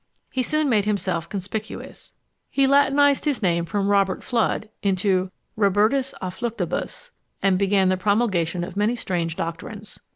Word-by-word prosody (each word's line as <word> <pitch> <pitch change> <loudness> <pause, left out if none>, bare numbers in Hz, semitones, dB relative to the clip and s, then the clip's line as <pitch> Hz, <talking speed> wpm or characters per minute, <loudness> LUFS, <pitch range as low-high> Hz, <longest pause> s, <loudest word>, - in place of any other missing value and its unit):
He 260 - 0
soon 305 +4 +1
made 215 -6 +2
himself 185 -5 -1
conspicuous. 205 +2 -6 0.4
He 275 - +2
latinised 280 +1 +4
his 285 -7 0
name 170 -2 +2
from 195 +4 -1
Robert 195 -2 +2
Fludd 230 -2 0
into 190 -1 +1 0.3
Robertus 215 +6 +2
à 180 -1 -3
Fluctibus, 235 - -4 0.3
and 190 -2 +3
began 195 -1 +3
the 185 - +2
promulgation 185 -4 +1
of 175 - -7
many 210 +4 +1
strange 170 -7 -2
doctrines. 185 +6 -5
205 Hz, 140 wpm, -23 LUFS, 185-235 Hz, 0.4 s, latinised